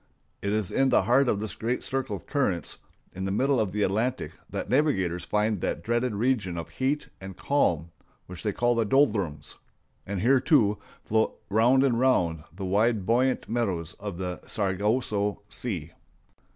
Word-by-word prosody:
It 100 - -1
is 105 -3 -1
in 135 0 +2
the - - +4
heart 125 +5 +3
of 100 - +1
this 110 0 -4
great 120 +3 -2
circle 130 -6 -2
of 95 - -10
currents 100 - -1 0.3
in 95 - -5
the 95 - -1
middle 130 +5 +2
of 105 -4 0
the 105 +1 0
Atlantic 115 +7 -1 0.2
that - - -4
navigators 95 - +1
find 105 -1 0
that - - -2
dreaded 120 0 0
region 105 -6 0
of 85 - -5
heat 140 +3 -1
and 95 -1 -8
calms 85 - +1 0.4
which 90 -1 -9
they 105 - -1
call 120 +4 +1
the 115 -1 +2
Doldrums; 105 - +1 0.5
and 100 -1 -3
here, 130 +6 +4
too, 115 - +3 0.3
float 110 +1 0
round 120 +5 +4
and 120 -4 +2
round 85 - +2
the 95 +3 -6
wide, 105 +2 +2
buoyant 125 +4 +1
meadows 95 -9 -2
of 100 -4 -5
the 90 -1 -4
Sargasso 105 +1 0
Sea. 85 -10 -5
105 Hz, 170 wpm, -27 LUFS, 95-125 Hz, 0.5 s, the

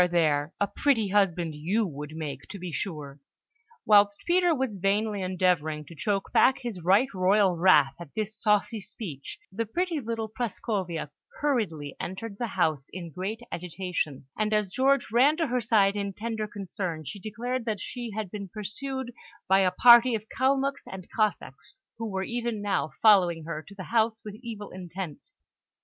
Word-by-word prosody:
There! 155 -3 +2
A 205 - +3
pretty 225 -1 +1
husband 180 -5 +2
you 185 +10 0
would 150 -2 -7
make, 155 -3 -6
to 200 - -7
be 180 -2 -6
sure!" 150 -6 -5 0.7
Whilst 205 -1 +5
Peter 350 -1 +3
was 260 -6 -2
vainly 200 +2 0
endeavouring 175 -5 0
to 165 - -12
choke 195 +5 -1
back 260 - +5
his 230 -8 -6
right 200 +9 +5
royal 190 0 +3
wrath 170 -6 +5
at 170 -5 -11
this 215 0 -2
saucy 210 +1 +1
speech, 190 - -7
the 225 +3 -3
pretty 345 - -1
little 225 -3 -3
Prascovia 195 - -3 0.3
hurriedly 195 - -1
entered 200 +2 -6
the 240 - -1
house, 155 -8 0
in 170 -3 -7
great 195 +7 -4
agitation; 175 -5 -3
and 215 0 +1
as 210 -3 0
George 270 +1 +2
ran 270 +7 +5
to 330 - +1
her 250 -3 0
side 205 -3 +3
in 200 -1 -2
tender 220 +1 -3
concern, 185 -5 -5
she 205 - -7
declared 235 +4 -3
that 215 -3 -2
she 240 +4 -5
had 210 -3 -5
been 200 -2 -6
pursued 245 +6 -5 0.3
by 190 +1 +5
a 190 -1 +4
party 240 +5 +7
of 215 - -3
Kalmuks 275 +2 +1
and 185 -2 -9
Cossacks, 215 - -2 0.2
who 225 -1 -3
were 190 -1 -2
even 235 0 -2
now 205 -5 0
following 180 -7 +5
her 160 -1 -5
to 200 - -12
the 190 - -7
house 225 -1 +2
with 210 - -6
evil 225 -4 -7
intent. 180 -3 -7
205 Hz, 170 wpm, -27 LUFS, 180-230 Hz, 0.7 s, party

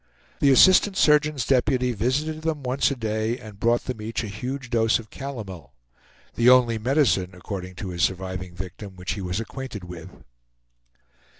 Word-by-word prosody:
The 140 - +4
assistant 190 +7 +6
surgeon's 150 - +3
deputy 125 -1 +2
visited 140 +8 -1
them 155 -3 -2
once 130 +2 +1
a 140 - -2
day 110 0 -2
and 110 -5 -12
brought 120 +2 +2
them 125 -4 -5
each 110 +1 -3
a - - -4
huge 125 +5 -6
dose 115 -1 +3
of 110 -2 -12
calomel, 105 - -8 0.6
the 120 +1 +4
only 120 -3 +5
medicine, 110 - +1
according 90 0 -7
to 95 +1 -6
his 85 -1 -4
surviving 95 -1 -2
victim, 95 +2 -8
which 90 -1 -4
he 100 - -6
was 90 +2 -2
acquainted 115 -3 -6
with. 90 -1 -9
115 Hz, 165 wpm, -24 LUFS, 95-135 Hz, 0.6 s, assistant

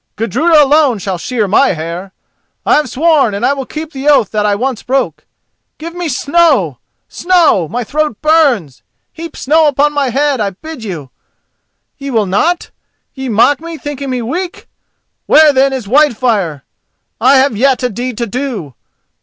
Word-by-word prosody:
Gudruda 300 +8 +3
alone 285 -4 +3
shall 190 -2 -4
shear 225 +1 -2
my 220 +6 +3
hair: 170 +4 -6 0.5
I - - +3
have 300 - -1
sworn 290 -7 +2
and 200 - -1
I 280 - +2
will 270 -3 -6
keep 310 0 -7
the 275 0 -6
oath 275 -9 +3
that 210 -1 0
I 205 - +1
once 250 +2 -3
broke. 265 +2 -2 0.5
Give 330 +2 -8
me 350 -2 -4
snow! 280 - +1 0.3
snow! 335 - +2
my 245 +8 -3
throat 300 -2 -2
burns! 280 - +1 0.3
Heap 335 0 -9
snow 310 +2 +2
on 295 +1 +2
my 285 -3 0
head, 275 0 0
I 205 - 0
bid 265 - -10
you. 160 - -7 0.9
Ye 280 0 -6
will 225 -5 +1
not? 260 - 0 0.4
Ye 265 -1 -6
mock 235 +6 +3
me, 330 0 -8
thinking 285 -2 -6
me 250 -2 -2
weak! 350 - -5 0.6
Where, 305 -1 +6
then, 270 +1 +3
is 260 -4 -4
Whitefire?—I 235 - 0
have 265 -3 +2
yet 260 +3 +1
a 250 - +1
deed 245 +2 -5
to 235 - -1
do! 230 - -5
265 Hz, 165 wpm, -13 LUFS, 215-300 Hz, 0.9 s, Where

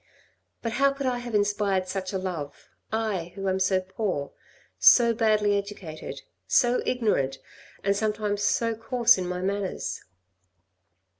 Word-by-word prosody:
But 230 - -1
how 275 +4 +3
could 275 0 -5
I 250 -1 0
have 240 -2 -5
inspired 205 -2 +1
such 185 0 -3
a 195 - -1
love, 175 -6 -6 0.2
I 205 -6 -2
who 195 -1 -4
am 190 0 +1
so 190 0 +2
poor, 185 -6 -3 0.5
so 235 -2 +7
badly 215 -2 +2
educated, 200 -6 -6 0.2
so 245 -1 +3
ignorant, 170 - +1 0.5
and 200 0 +2
sometimes 210 -1 -1
so 230 +2 +1
coarse 235 0 +3
in 180 - -3
my 180 0 -3
manners 200 0 -2
205 Hz, 140 wpm, -26 LUFS, 185-225 Hz, 0.5 s, so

